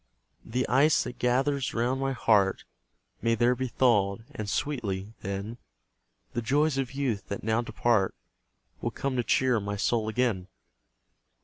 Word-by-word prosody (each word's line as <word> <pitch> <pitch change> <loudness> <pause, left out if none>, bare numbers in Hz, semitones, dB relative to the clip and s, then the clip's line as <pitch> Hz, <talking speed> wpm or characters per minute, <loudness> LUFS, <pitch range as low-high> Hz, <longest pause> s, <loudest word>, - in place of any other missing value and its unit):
The 125 +3 -1
ice 140 +4 +4
that 125 - -7
gathers 135 +2 +1
round 125 +3 0
my 135 0 0
heart 105 -5 +2 0.6
May 115 0 +2
there 120 +2 +3
be 130 +1 -2
thawed; 110 -4 +2
and 105 -1 -5
sweetly, 110 -8 -2
then, 100 +4 -5 0.7
The 120 - -1
joys 140 +4 +2
of 135 -1 -3
youth, 120 -9 -1
that 100 - -5
now 110 +2 +1
depart, 120 -5 +1 0.7
Will - - 0
come 135 -1 -3
to 120 - +1
cheer 125 +1 +2
my 100 0 -3
soul 110 +2 0
again. 110 -6 0
120 Hz, 145 wpm, -28 LUFS, 105-130 Hz, 0.7 s, ice